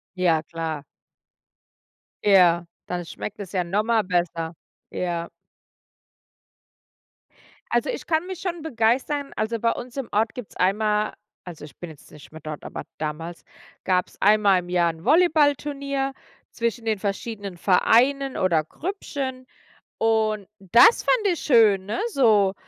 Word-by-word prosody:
Ja, 170 Hz, -4 st, +2 dB
klar. 160 Hz, -3 st, -5 dB, 1.4 s
Ja, 175 Hz, -4 st, +5 dB, 0.2 s
dann 175 Hz, -1 st, -4 dB
schmeckt 210 Hz, +5 st, -7 dB
es 195 Hz, -3 st, -7 dB
ja 185 Hz, -2 st, +1 dB
noch 195 Hz, +5 st, 0 dB
mal 225 Hz, -1 st, +2 dB
besser. 175 Hz, -3 st, -1 dB, 0.4 s
Ja. 170 Hz, -1 st, -3 dB, 2.4 s
Also -, -, +1 dB
ich -, -, -7 dB
kann 320 Hz, 0 st, +1 dB
mich 375 Hz, -1 st, -6 dB
schon 345 Hz, -4 st, -4 dB
begeistern, 270 Hz, +2 st, 0 dB
also 220 Hz, +1 st, -2 dB
bei 230 Hz, +1 st, +2 dB
uns 245 Hz, +1 st, -7 dB
im 270 Hz, -4 st, -4 dB
Ort 220 Hz, +1 st, +1 dB
gibt's 245 Hz, -5 st, -9 dB
einmal 210 Hz, +3 st, +1 dB, 0.3 s
also 170 Hz, -4 st, -9 dB
ich 145 Hz, -, -15 dB
bin 175 Hz, -, -7 dB
jetzt 155 Hz, -3 st, -15 dB
nicht 150 Hz, -, -14 dB
mehr 160 Hz, 0 st, -11 dB
dort, 155 Hz, 0 st, -7 dB
aber -, -, -6 dB, 0.2 s
damals, 160 Hz, +2 st, -5 dB, 0.4 s
gab's 180 Hz, -1 st, 0 dB
einmal 205 Hz, -2 st, +4 dB
im 175 Hz, 0 st, -9 dB
Jahr 175 Hz, -1 st, +2 dB
'n 160 Hz, 0 st, -15 dB
Volleyballturnier 285 Hz, -, +2 dB, 0.4 s
zwischen 235 Hz, 0 st, -2 dB
den 220 Hz, -2 st, 0 dB
verschiedenen 200 Hz, -1 st, -4 dB
Vereinen 255 Hz, +9 st, +3 dB
oder 170 Hz, -4 st, +2 dB
Grüppchen. 265 Hz, -, -5 dB, 0.5 s
Und 220 Hz, -3 st, +1 dB
das 195 Hz, -, +6 dB
fand 445 Hz, -4 st, +2 dB
ich 355 Hz, -4 st, +1 dB
schön, 220 Hz, -8 st, +4 dB
ne, 210 Hz, -, -2 dB
so. 210 Hz, -, +4 dB
210 Hz, 140 wpm, -24 LUFS, 175-255 Hz, 2.4 s, das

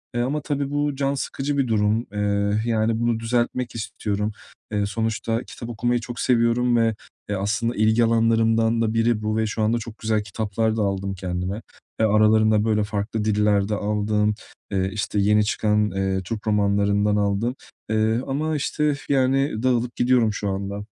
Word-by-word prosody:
Eee, 120 Hz, -, +1 dB
ama 145 Hz, +4 st, -1 dB
tabii 145 Hz, -1 st, -2 dB
bu 145 Hz, -1 st, 0 dB
can 140 Hz, 0 st, 0 dB
sıkıcı 140 Hz, +1 st, -3 dB
bir 135 Hz, -3 st, +1 dB
durum. 110 Hz, +1 st, +1 dB
Eee, 100 Hz, 0 st, 0 dB
yani, 110 Hz, 0 st, +1 dB
bunu 120 Hz, -1 st, +1 dB
düzeltmek 120 Hz, +1 st, -1 dB
istiyorum. 105 Hz, -1 st, -3 dB, 0.4 s
Eee, 105 Hz, -1 st, 0 dB
sonuçta 115 Hz, +2 st, -2 dB
kitap 120 Hz, -, -9 dB
okumayı 120 Hz, +1 st, 0 dB
çok 120 Hz, 0 st, -7 dB
seviyorum 120 Hz, 0 st, +2 dB
ve, 115 Hz, -2 st, +2 dB, 0.3 s
eee, 100 Hz, -, 0 dB
aslında 115 Hz, +5 st, -1 dB
ilgi 110 Hz, +2 st, +3 dB
alanlarımdan 115 Hz, 0 st, +2 dB
da 110 Hz, -1 st, 0 dB
biri 115 Hz, -1 st, +1 dB
bu 110 Hz, 0 st, -1 dB
ve 110 Hz, -, +1 dB
şu 110 Hz, +1 st, -3 dB
anda 110 Hz, +2 st, +2 dB
çok 115 Hz, -1 st, -8 dB
güzel 110 Hz, -1 st, 0 dB
kitaplar 110 Hz, +2 st, -1 dB
da -, -, +1 dB
aldım 100 Hz, -1 st, -1 dB
kendime. 90 Hz, +3 st, -3 dB, 0.4 s
Eee, 110 Hz, -, +4 dB
aralarında 110 Hz, 0 st, +4 dB
böyle 105 Hz, -1 st, +2 dB
farklı 105 Hz, +1 st, -3 dB
diller 105 Hz, -1 st, +2 dB
de 105 Hz, -, 0 dB
aldım, 105 Hz, 0 st, 0 dB, 0.4 s
eee, 95 Hz, -1 st, 0 dB
işte, 105 Hz, -1 st, -2 dB
yeni 105 Hz, +1 st, +3 dB
çıkan, 105 Hz, 0 st, +1 dB
eee, 95 Hz, -1 st, -1 dB
Türk 110 Hz, +3 st, -5 dB
romanlarından 100 Hz, 0 st, +2 dB
aldım. 105 Hz, +5 st, 0 dB, 0.3 s
Eee, 110 Hz, +2 st, +1 dB
ama 155 Hz, +3 st, -1 dB
işte, 150 Hz, +1 st, 0 dB, 0.2 s
yani, 135 Hz, -3 st, +1 dB
dağılıp 125 Hz, -1 st, +1 dB
gidiyorum 120 Hz, -3 st, +3 dB
şu 100 Hz, 0 st, -3 dB
anda. 100 Hz, +1 st, -3 dB
110 Hz, 170 wpm, -23 LUFS, 105-120 Hz, 0.4 s, Eee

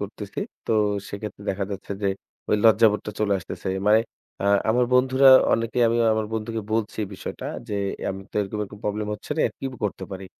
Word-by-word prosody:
করতেছি 100 Hz, 0 st, -7 dB, 0.3 s
তো -, -, +1 dB, 0.4 s
সেক্ষেত্রে 100 Hz, 0 st, -7 dB
দেখা 100 Hz, 0 st, -2 dB
যাচ্ছে 100 Hz, 0 st, -5 dB
যে -, -, +1 dB, 0.4 s
ওই 105 Hz, -, +4 dB
লজ্জাবোধটা 110 Hz, -1 st, +4 dB
চলে 100 Hz, -1 st, +2 dB
আসতেছে। 90 Hz, -, -6 dB, 0.2 s
মানে 110 Hz, +2 st, +6 dB, 0.4 s
আ -, -, +2 dB, 0.2 s
আমার 125 Hz, +2 st, +3 dB
বন্ধুরা 130 Hz, +1 st, +5 dB, 0.2 s
অনেকেই 115 Hz, +2 st, +1 dB
আমি 115 Hz, -, +1 dB, 0.2 s
আমার 110 Hz, -1 st, -1 dB
বন্ধুকে 110 Hz, +1 st, -3 dB
বলছি 110 Hz, -1 st, -1 dB
এই 95 Hz, -, -9 dB
বিষয়টা -, -, -6 dB, 0.2 s
যে 105 Hz, -, -3 dB, 0.4 s
আমি 95 Hz, 0 st, -6 dB
তো -, -, -28 dB
এরকম, 105 Hz, +1 st, -3 dB
এরকম, 105 Hz, 0 st, -8 dB
problem 105 Hz, 0 st, -1 dB
হচ্ছে -, -, -13 dB
রে, -, -, +4 dB, 0.2 s
কি -, -, -4 dB, 0.2 s
করতে 95 Hz, -1 st, -3 dB
পারি? 95 Hz, 0 st, -7 dB
105 Hz, 185 wpm, -24 LUFS, 100-115 Hz, 0.4 s, মানে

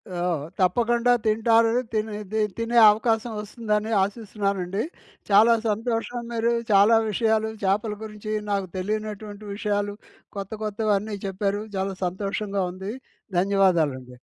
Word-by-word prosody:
ఆ! -, -, -3 dB, 0.4 s
తప్పకుండా 235 Hz, +6 st, +2 dB
తింటారు. 225 Hz, +1 st, +4 dB, 0.2 s
తినేది 215 Hz, -1 st, -2 dB, 0.2 s
తినే 230 Hz, +1 st, 0 dB
అవకాశం 225 Hz, +2 st, 0 dB
వస్తుందని 210 Hz, 0 st, -2 dB
ఆశిస్తున్నానండి. 200 Hz, -2 st, -2 dB, 0.5 s
చాలా 215 Hz, +4 st, +6 dB
సంతోషం. 230 Hz, +2 st, -1 dB
మీరు 230 Hz, 0 st, +1 dB, 0.2 s
చాలా 205 Hz, +3 st, +6 dB
విషయాలు, 220 Hz, 0 st, +1 dB
చేపల 210 Hz, +3 st, +1 dB
గురించి 215 Hz, 0 st, -7 dB, 0.2 s
నాకు 195 Hz, -2 st, -1 dB
తెలియనటువంటి 210 Hz, +1 st, -4 dB
విషయాలు. 205 Hz, -1 st, -1 dB, 0.4 s
కొత్త 195 Hz, -1 st, -5 dB
కొత్తవన్ని 210 Hz, 0 st, -1 dB
చెప్పారు. 195 Hz, +1 st, -1 dB, 0.2 s
చాలా 190 Hz, 0 st, -2 dB
సంతోషంగా 195 Hz, +2 st, -2 dB
ఉంది. 190 Hz, +3 st, -6 dB, 0.5 s
ధన్యవాదాలండి. 165 Hz, -10 st, +1 dB
210 Hz, 105 wpm, -25 LUFS, 195-220 Hz, 0.5 s, చాలా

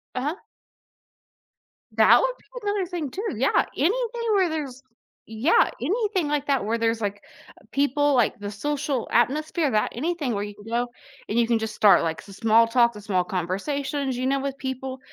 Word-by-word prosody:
Uh-huh. 290 Hz, +7 st, -1 dB, 1.6 s
That -, -, +6 dB
would -, -, 0 dB
be -, -, -26 dB, 0.2 s
another 405 Hz, -2 st, 0 dB
thing 335 Hz, -6 st, -4 dB
too, 400 Hz, -, -5 dB
yeah, 265 Hz, +3 st, +2 dB
anything 465 Hz, -, 0 dB
where 375 Hz, -4 st, +3 dB
there's 275 Hz, -5 st, -5 dB, 0.5 s
yeah, 225 Hz, +9 st, +3 dB
anything 390 Hz, -, 0 dB
like 290 Hz, -1 st, -1 dB
that 270 Hz, -7 st, +1 dB
where 230 Hz, +2 st, 0 dB
there's 225 Hz, 0 st, 0 dB
like, 205 Hz, 0 st, -3 dB, 0.4 s
u -, -, -24 dB
people 285 Hz, +1 st, +2 dB
like 245 Hz, -4 st, +2 dB
the 205 Hz, 0 st, -5 dB
social 280 Hz, +2 st, -2 dB
atmosphere 295 Hz, +5 st, +1 dB
that 215 Hz, -1 st, +1 dB
anything 300 Hz, -2 st, -2 dB
where 200 Hz, -, -2 dB
you 205 Hz, 0 st, -6 dB
can 205 Hz, -, -15 dB
go 240 Hz, +2 st, -1 dB, 0.4 s
and 225 Hz, +3 st, +1 dB
you 230 Hz, -, +3 dB
can 235 Hz, -1 st, +2 dB
just 220 Hz, -1 st, -4 dB
start 200 Hz, -4 st, +5 dB
like 160 Hz, -1 st, -2 dB
some 195 Hz, -, -13 dB
small 225 Hz, +1 st, +4 dB
talk, 235 Hz, -1 st, +3 dB
small 190 Hz, -3 st, 0 dB
conversations, 265 Hz, -, -2 dB
you 255 Hz, +1 st, -1 dB
know, 275 Hz, 0 st, +1 dB
with 275 Hz, 0 st, -4 dB
people 265 Hz, 0 st, -5 dB
260 Hz, 180 wpm, -24 LUFS, 225-300 Hz, 1.6 s, That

